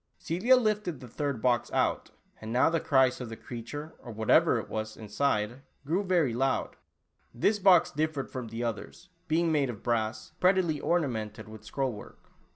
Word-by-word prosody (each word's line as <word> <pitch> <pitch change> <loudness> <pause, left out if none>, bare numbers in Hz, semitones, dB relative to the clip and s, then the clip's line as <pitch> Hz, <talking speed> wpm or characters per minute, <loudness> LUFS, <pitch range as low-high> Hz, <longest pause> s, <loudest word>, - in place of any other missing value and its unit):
Celia 200 +11 +3
lifted 210 - 0
the 125 - -10
third 140 -1 -3
box 120 -2 +1
out, - - 0 0.3
and 110 0 -6
now 125 +6 +3
the 165 - +1
cries 130 -4 +3
of 120 - -5
the 115 - -6
creature, 140 +8 -7
or 120 - -10
whatever 110 0 +3
it - - -4
was, 110 0 -4
inside, 110 +2 -1 0.2
grew 175 +8 0
very 175 - +2
loud. 130 +2 0 0.6
This 205 - +2
box 185 -3 +5
differed 155 -2 -2
from 125 -3 -5
the 115 +2 -5
others, 115 - -5 0.2
be 160 +2 +2
ing 170 -1 +1
made 145 -4 +2
of 115 -3 -7
brass, 110 -2 -1
prettily 180 -5 +3
ornamented 115 -13 -1
with 110 -1 -11
scroll 130 +4 -2
work. 105 - -13
130 Hz, 175 wpm, -29 LUFS, 115-165 Hz, 0.6 s, box